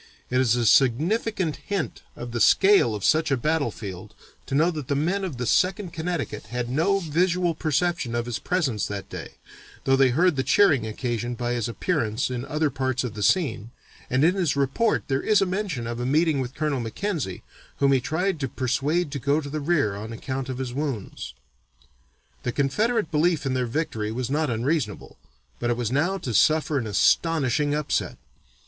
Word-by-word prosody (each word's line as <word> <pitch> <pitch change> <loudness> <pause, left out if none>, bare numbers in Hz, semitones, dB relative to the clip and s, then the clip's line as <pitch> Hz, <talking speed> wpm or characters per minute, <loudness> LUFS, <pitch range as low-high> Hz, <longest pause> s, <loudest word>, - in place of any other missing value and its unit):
It 125 +1 +3
is 120 -3 +3
a 120 -1 0
significant 155 - +2
hint 200 -5 -4
of 120 0 -7
the 120 -1 -2
scale 190 - +5
of 105 - -4
such 160 0 +3
a 135 - +2
battlefield 120 - -3 0.3
to 135 - -2
know 165 +5 +3
that 150 -6 -6
the 140 - 0
men 175 +8 0
of 170 -9 -4
the 125 - -3
Second 185 - +1
Connecticut 165 -1 -4
had 125 0 -3
no 165 +9 +2
visual 175 +1 +1
perception 155 -4 -1
of 120 0 -1
his 120 -2 -3
presence 150 - -1
that 100 -2 -6
day, - - -8 0.5
though 135 - +3
they 135 -1 +4
heard 165 +4 +2
the 130 - +1
cheering 145 - +4
occasioned 120 +1 -3
by 120 0 -1
his 120 -1 -2
appearance 120 - -1
in 125 +1 -3
other 150 0 0
parts 130 -1 -1
of 125 -4 -4
the 105 - -6
scene, 140 - +1 0.4
and 130 +2 +2
in 170 +3 +5
his 180 -7 0
report 140 - +1
there 135 0 0
is 215 -2 +3
mention 185 - -2
of 120 +1 -4
a 120 - -2
meeting 155 +1 +2
with 130 +1 -4
Colonel 150 -3 -1
Mackenzie, 120 - -3 0.3
whom 140 -1 +3
he 135 -2 +3
tried 160 +5 -1
to 135 - -1
persuade 140 +6 -1
to 140 - -3
go 140 +4 +1
to 145 -2 -7
the 155 - -2
rear 140 -10 +1
on 110 +3 -7
account 130 +3 -4
of 130 - -4
his 130 -2 -4
wounds. 125 - -4 1.1
The - - -2
Confederate 210 - 0
belief 160 0 +1
in 135 - 0
their 125 -1 0
victory 115 -6 -2
was 125 +2 -3
not 150 0 +1
unreasonable, 120 -1 -2 0.4
but 120 - -1
it 120 - 0
was 120 -2 -2
now 170 +8 +1
to 125 -10 -5
suffer 155 +3 +3
an 115 - -4
astonishing 145 - +2
upset. 150 -1 -1
140 Hz, 190 wpm, -25 LUFS, 120-165 Hz, 1.1 s, scale